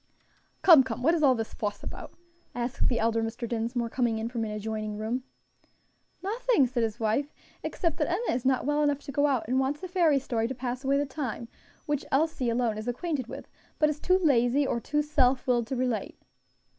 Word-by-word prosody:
"Come, 330 Hz, -7 st, +9 dB
come, 250 Hz, -2 st, -4 dB
what 325 Hz, +5 st, +4 dB
is 335 Hz, -, +1 dB
all 270 Hz, -4 st, +5 dB
this 225 Hz, -2 st, -4 dB
fuss 205 Hz, -1 st, -4 dB
about?" -, -, -8 dB, 0.4 s
asked 245 Hz, +1 st, -1 dB
the 240 Hz, -, +1 dB
elder 225 Hz, 0 st, +1 dB
Mr. 225 Hz, +1 st, -3 dB
Dinsmore, 235 Hz, +1 st, -1 dB
coming 235 Hz, -1 st, 0 dB
in 225 Hz, +1 st, -3 dB
from 235 Hz, -2 st, -3 dB
an 220 Hz, -, -3 dB
adjoining 215 Hz, 0 st, -4 dB
room. 235 Hz, +4 st, -3 dB, 1.0 s
"Nothing," 455 Hz, -, +2 dB
said 245 Hz, -1 st, -1 dB
his 225 Hz, +1 st, -2 dB
wife, 230 Hz, +7 st, 0 dB, 0.3 s
"except 330 Hz, -3 st, -2 dB
that 305 Hz, -2 st, 0 dB
Enna 380 Hz, +8 st, 0 dB
is 245 Hz, -, -2 dB
not 260 Hz, -1 st, +1 dB
well 295 Hz, +1 st, +1 dB
enough 290 Hz, -1 st, +2 dB
to 280 Hz, -, -7 dB
go 285 Hz, +2 st, +2 dB
out, 265 Hz, -5 st, 0 dB
and 255 Hz, +3 st, +1 dB
wants 275 Hz, +5 st, -1 dB
a -, -, -3 dB
fairy 340 Hz, -5 st, +3 dB
story 235 Hz, -4 st, -1 dB
to 260 Hz, -, -5 dB
pass 250 Hz, +1 st, -4 dB
away 275 Hz, +1 st, +2 dB
the 285 Hz, -, +1 dB
time, 255 Hz, -5 st, -5 dB, 0.4 s
which 295 Hz, -3 st, -1 dB
Elsie 285 Hz, -3 st, +1 dB
alone 230 Hz, -2 st, 0 dB
is 215 Hz, -, -7 dB
acquainted 265 Hz, 0 st, -2 dB
with, -, -, -8 dB, 0.3 s
but 305 Hz, -, +3 dB
is 300 Hz, -, -6 dB
too 365 Hz, +4 st, +3 dB
lazy 275 Hz, -5 st, +3 dB
or 235 Hz, -, 0 dB
too 295 Hz, +6 st, 0 dB
self 265 Hz, -4 st, +2 dB
willed 240 Hz, -3 st, +1 dB
to 265 Hz, -, -3 dB
relate." 245 Hz, -5 st, -2 dB
255 Hz, 210 wpm, -28 LUFS, 230-295 Hz, 1.0 s, Come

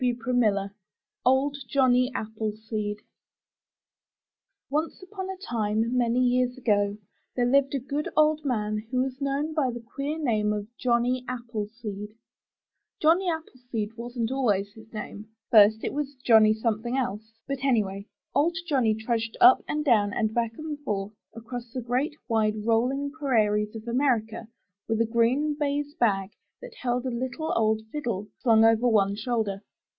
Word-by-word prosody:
351 245 Hz, 0 st, 0 dB
MY 210 Hz, -4 st, +3 dB
BOOK 195 Hz, 0 st, -6 dB
HOUSE -, -, -35 dB, 0.5 s
OLD 275 Hz, +2 st, +3 dB
JOHNNY 255 Hz, -1 st, +3 dB
APPLESEED 215 Hz, -1 st, -3 dB, 1.7 s
Once 310 Hz, +5 st, -2 dB
upon 380 Hz, 0 st, -6 dB
a 380 Hz, -, -5 dB
time 225 Hz, -, -1 dB
many 240 Hz, 0 st, +2 dB
years 250 Hz, 0 st, +2 dB
ago, 205 Hz, -4 st, +1 dB, 0.4 s
there 245 Hz, -, +2 dB
lived 275 Hz, +2 st, +3 dB
a -, -, 0 dB
good 280 Hz, +4 st, -3 dB
old 310 Hz, 0 st, +4 dB
man 215 Hz, -6 st, -1 dB
who 255 Hz, -, -2 dB
was 265 Hz, +1 st, -5 dB
known 280 Hz, +3 st, -1 dB
by 295 Hz, -5 st, +1 dB
the 240 Hz, 0 st, -5 dB
queer 275 Hz, +6 st, -4 dB
name 215 Hz, -8 st, +1 dB
of 210 Hz, -1 st, -3 dB
''Johnny 245 Hz, +1 st, +1 dB
Appleseed/' 215 Hz, -3 st, -6 dB, 0.8 s
Johnny 345 Hz, +4 st, +3 dB
Appleseed 245 Hz, -9 st, -4 dB
wasn't 240 Hz, 0 st, -3 dB
always 205 Hz, -7 st, 0 dB
his 220 Hz, -1 st, -15 dB
name; 215 Hz, -1 st, -7 dB, 0.2 s
first 220 Hz, 0 st, +6 dB
it -, -, -2 dB
was 285 Hz, -1 st, -3 dB
Johnny 220 Hz, -2 st, +6 dB
Some 220 Hz, -1 st, -1 dB
Thing 240 Hz, +3 st, -2 dB
Else; 220 Hz, -4 st, -3 dB
but, 275 Hz, -1 st, -4 dB
anyway, 205 Hz, -6 st, 0 dB, 0.3 s
old 325 Hz, +5 st, +2 dB
Johnny 255 Hz, -9 st, +2 dB
trudged 225 Hz, 0 st, -2 dB
up 370 Hz, +1 st, +7 dB
and 300 Hz, 0 st, -2 dB
down 210 Hz, -6 st, +3 dB
and 220 Hz, 0 st, 0 dB
back 230 Hz, -1 st, -1 dB
and 310 Hz, -1 st, -5 dB
forth 210 Hz, -7 st, -3 dB, 0.2 s
across 235 Hz, +1 st, -7 dB
the 255 Hz, -, -3 dB
great, 255 Hz, +6 st, -1 dB
wide, 215 Hz, -2 st, 0 dB
rolling 255 Hz, +5 st, +1 dB
prairies 215 Hz, -8 st, +1 dB
of 220 Hz, +1 st, -8 dB
America, 235 Hz, -3 st, 0 dB, 0.4 s
with 225 Hz, -1 st, 0 dB
a 230 Hz, -, +3 dB
green 240 Hz, +6 st, +2 dB
baize 290 Hz, 0 st, -1 dB
bag 195 Hz, -7 st, +1 dB, 0.3 s
that -, -, -10 dB
held 245 Hz, 0 st, -1 dB
a -, -, 0 dB
little 255 Hz, +6 st, -3 dB
old 220 Hz, -1 st, +2 dB
fiddle, 235 Hz, -9 st, -3 dB
slung 225 Hz, -3 st, +5 dB
over 225 Hz, +2 st, +4 dB
one 200 Hz, -3 st, +3 dB
shoulder. 215 Hz, -3 st, -2 dB
235 Hz, 155 wpm, -26 LUFS, 215-275 Hz, 1.7 s, up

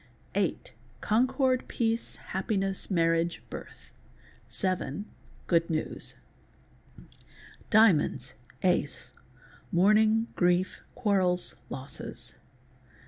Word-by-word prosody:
Hight—concord, 210 Hz, -, 0 dB
peace, 230 Hz, 0 st, -1 dB
happiness, 195 Hz, 0 st, -2 dB
marriage, 165 Hz, -2 st, +1 dB
birth. -, -, -10 dB, 0.6 s
Seven 190 Hz, +2 st, -1 dB, 0.4 s
—good 170 Hz, -1 st, +2 dB
news. 155 Hz, -1 st, -2 dB, 0.9 s
_ -, -, -15 dB, 0.7 s
Diamonps.—Ace—mourning, 185 Hz, -, +1 dB
grief, 180 Hz, +1 st, +2 dB
quarrels, 190 Hz, -6 st, +1 dB, 0.2 s
losses. 135 Hz, +2 st, -7 dB
185 Hz, 60 wpm, -29 LUFS, 165-215 Hz, 0.9 s, good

